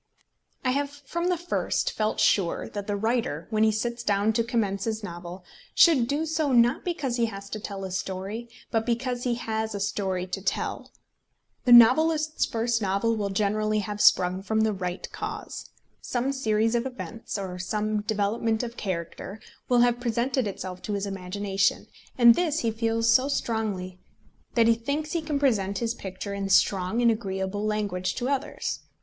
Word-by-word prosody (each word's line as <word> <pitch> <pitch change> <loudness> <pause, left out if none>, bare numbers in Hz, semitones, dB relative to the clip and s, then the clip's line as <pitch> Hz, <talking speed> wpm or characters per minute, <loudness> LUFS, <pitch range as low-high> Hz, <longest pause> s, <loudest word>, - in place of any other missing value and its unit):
I 255 - +3
have 280 +2 0
from 290 +5 -4
the 360 - +1
first 350 +2 -1
felt 215 0 -1
sure 185 -5 +2
that 205 0 -6
the 205 - -1
writer, 220 -7 -1
when 215 0 +2
he 220 - +5
sits 235 +2 -2
down 205 0 +1
to 230 - +2
commence 210 -5 -1
his 220 -1 -2
novel, 175 0 -8 0.3
should 280 -9 +6
do 290 +4 0
so, 315 -2 0
not 240 0 +4
because 290 -9 -2
he 235 -1 +2
has 200 -2 -8
to 215 - -4
tell 200 -2 -6
a 190 - -5
story, 195 +5 -4 0.2
but 225 -1 +1
because 245 +1 -2
he 245 -1 +1
has 220 -2 -3
a - - -3
story 190 -2 -1
to 185 +1 -5
tell. - - -2 0.8
The 250 - +3
novelist's 310 +6 +6
first 230 0 0
novel 200 +3 +1
will 205 -2 -2
generally 215 +2 0
have 210 0 -4
sprung 185 +1 +4
from 220 +2 0
the 220 -1 +2
right 180 -1 -4
cause. - - -6 0.3
Some 250 +2 -1
series 225 -4 +1
of 240 +2 +1
events, 230 -4 -6
or 185 -2 -5
some 210 +3 -1
development 220 +2 0
of 235 0 -6
character, 185 +2 -5 0.3
will 245 -1 +5
have 240 0 +3
presented 245 +1 0
itself 185 -2 -6
to 210 - -4
his 200 0 -1
imagination, 195 0 -1 0.3
and 235 -2 +8
this 320 +1 0
he 230 - +1
feels 225 0 0
so 255 +4 +5
strongly 210 -9 -2 0.6
that 230 -2 +5
he 230 - +6
thinks 285 +7 -3
he 335 - 0
can 305 -2 -2
present 205 -8 +1
his 230 +1 -1
picture 200 -2 -6
in 200 -1 -3
strong 195 +4 +3
and 235 - +6
agreeable 195 -2 -3
language 200 -4 -1
to 250 +1 -2
others. 275 -1 -2
220 Hz, 180 wpm, -26 LUFS, 200-240 Hz, 0.8 s, and